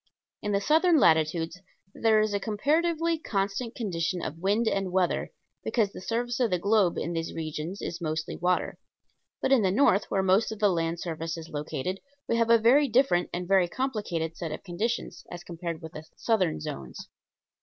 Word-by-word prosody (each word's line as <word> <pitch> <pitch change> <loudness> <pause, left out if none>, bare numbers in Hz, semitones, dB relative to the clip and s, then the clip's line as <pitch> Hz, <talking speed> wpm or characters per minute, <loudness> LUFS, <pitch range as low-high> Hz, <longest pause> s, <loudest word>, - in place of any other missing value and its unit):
In 210 - -2
the 200 - +2
southern 320 - +4
latitudes 165 - +2 0.3
there 220 -1 +3
is 215 -1 0
a 200 - +1
comparatively 320 +9 +1
constant 205 -2 -2
condition 180 -5 -2
of 160 - -5
wind 205 +6 +1
and 195 -3 0
weather, 185 -1 +1 0.3
because 215 -5 +1
the - - -9
surface 240 +4 -2
of 245 -3 +2
the 180 - +1
globe 200 -1 +2
in 170 - -2
these 165 0 -3
regions 160 +4 -5
is 175 +1 -5
mostly 155 -1 -3
water; 180 +1 0 0.6
but - - +1
in 265 -4 +6
the 190 - +2
north, 200 -1 +3
where 195 - +1
most 190 +4 +3
of 220 - -5
the 205 -1 +3
land 165 -1 -1
surface 165 -1 -4
is 165 0 -8
located, 150 +5 -4 0.3
we 230 - +1
have 230 0 +2
a 230 - +7
very 255 +6 +5
different 235 -8 +2
and 175 +1 -3
a - - -10
very 190 -2 +4
complicated 175 -9 -3
set 165 -2 -5
of 155 - -6
conditions, 210 +6 -3
as 175 0 -8
compared 170 -1 -6
with 160 - -7
the 155 - -8
southern 190 - +1
zones. 65 -4 -7
190 Hz, 190 wpm, -27 LUFS, 165-225 Hz, 0.6 s, a